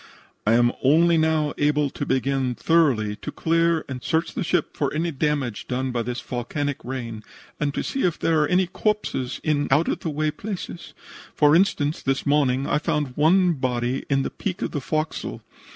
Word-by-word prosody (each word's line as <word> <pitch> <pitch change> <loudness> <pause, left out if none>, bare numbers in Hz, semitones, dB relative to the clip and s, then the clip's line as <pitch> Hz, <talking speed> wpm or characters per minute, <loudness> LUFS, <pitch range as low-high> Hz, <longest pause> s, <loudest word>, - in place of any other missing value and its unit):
I 110 - +5
am 120 +1 +4
only 165 +5 +5
now 160 -2 +2
able 145 -1 +2
to - - -5
begin 130 -1 0
thoroughly 130 -12 +2
to - - -6
clear 165 0 +1
and 130 -2 -6
search 160 +4 -1
the - - -2
ship 175 -2 0
for 145 - -1
any 165 +2 -1
damage 140 -6 -1
done 130 +1 -2
by 120 -1 -1
this 120 +2 -3
volcanic 140 +3 -3
rain, 120 -4 -5 0.4
and 150 -1 0
to - - -1
see 270 - -2
if 175 -3 +1
there 160 -2 +2
are 150 - +2
any 185 +1 +3
corpses 180 - -2
in 145 -2 +1
out 145 +5 +3
of - - -1
the 165 - -3
way 155 +1 0
places. 180 0 -7 0.4
For 150 0 +5
instance, 160 -5 +2
this 135 0 -1
morning, 140 -2 +2
I 150 - +1
found 150 -5 -1
one 175 +4 +4
body 125 -2 -1
in 135 -1 +2
the - - -3
peak 190 -2 -4
of - - -2
the 145 - -3
forecastle. 155 +6 -3
150 Hz, 190 wpm, -24 LUFS, 130-165 Hz, 0.4 s, I